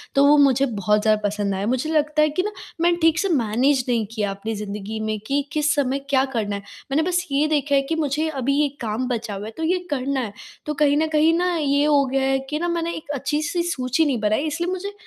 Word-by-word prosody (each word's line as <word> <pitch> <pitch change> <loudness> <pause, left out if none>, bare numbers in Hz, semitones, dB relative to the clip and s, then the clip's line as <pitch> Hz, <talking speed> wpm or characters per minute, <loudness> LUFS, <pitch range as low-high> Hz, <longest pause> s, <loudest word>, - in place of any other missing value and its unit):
तो 275 +1 +5
वो 295 +1 +6
मुझे 275 -1 +4
बहुत 210 -3 +1
ज़्यादा 215 0 +2
पसंद 205 -1 -2
आया। 195 - -2
मुझे 260 +5 -1
लगता 305 0 +2
है 305 - +4
कि 365 +5 -1
ना 420 - -2 0.3
मैंने 345 0 +3
ठीक 325 0 +4
से 390 - 0
मैनेज 255 -1 +2
नहीं 230 -3 +1
किया 210 -3 -2
अपनी 220 +3 -5
ज़िंदगी 210 +1 -5
में 215 -1 -2
कि 280 +1 +1
किस 300 -1 +2
समय 275 -1 0
क्या 265 -1 +3
करना 205 -2 -1
है। 200 - -5 0.3
मैंने 300 +4 +2
बस 355 0 0
ये 290 +2 +2
देखा 290 -2 +1
है 275 - +4
कि 325 - +1
मुझे 305 0 0
अभी 275 -2 -1
ये 295 - +3
काम 230 +3 -2
बचा 230 -4 -3
हुआ 200 +2 -6
है 220 - -6
तो 320 - -4
ये 360 +3 +1
करना 275 -1 -1
है। 215 -5 -4 0.3
तो 300 - -2
कहीं 290 0 +3
न 315 +1 +2
कहीं 310 +2 +4
न 360 0 +1
ये 285 -1 +2
हो 285 -2 +4
गया 270 +1 0
है 270 0 +1
कि 300 +1 -2
ना 345 - -1
मैंने 335 0 -1
एक 310 - -9
अच्छी-सी 300 +5 -1
सूची 285 -2 0
नहीं 260 -6 0
बनाई 215 +7 +1
इसलिए 345 +4 -2
मुझे 395 +2 -4
280 Hz, 250 wpm, -22 LUFS, 230-310 Hz, 0.3 s, वो